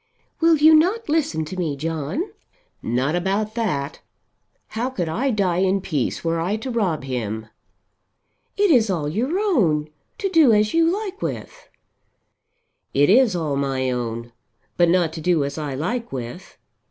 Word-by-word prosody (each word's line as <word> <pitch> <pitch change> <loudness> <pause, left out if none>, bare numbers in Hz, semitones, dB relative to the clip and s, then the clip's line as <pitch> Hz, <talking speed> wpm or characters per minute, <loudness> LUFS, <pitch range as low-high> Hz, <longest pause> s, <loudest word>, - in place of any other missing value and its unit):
"Will 330 -1 +4
you 310 +2 +7
not 365 +7 +3
listen 285 - 0
to 170 - -7
me, 160 -6 -1
John?" 160 - -2 0.6
"Not 130 +7 0
about 200 +4 -1
that. 160 -12 -2 0.7
How 235 +3 -2
could 185 -10 -3
I 235 +13 -1
die 190 -7 +1
in 190 +1 +2
peace 155 -9 -2
were 165 0 0
I 180 +5 -1
to 255 +4 -5
rob 190 - -1
him?" 110 -4 -4 1.1
"It 405 -2 +3
is 230 -7 +4
all 165 -6 -1
your 245 - -1
own, 170 - +1 0.3
to 405 -3 -1
do 320 -10 +5
as 210 0 +2
you 330 0 +4
like 400 0 -4
with." - - -6 1.3
"It 145 +5 +4
is 235 -3 +5
all 155 -5 -1
my 135 -2 -1
own, 120 -1 -4 0.4
but 175 -1 +3
not 170 -2 +2
to 160 - -6
do 170 -2 +2
as 140 +2 -4
I 145 -3 -4
like 230 - -3
with. 130 +8 -7
180 Hz, 160 wpm, -22 LUFS, -, 1.3 s, you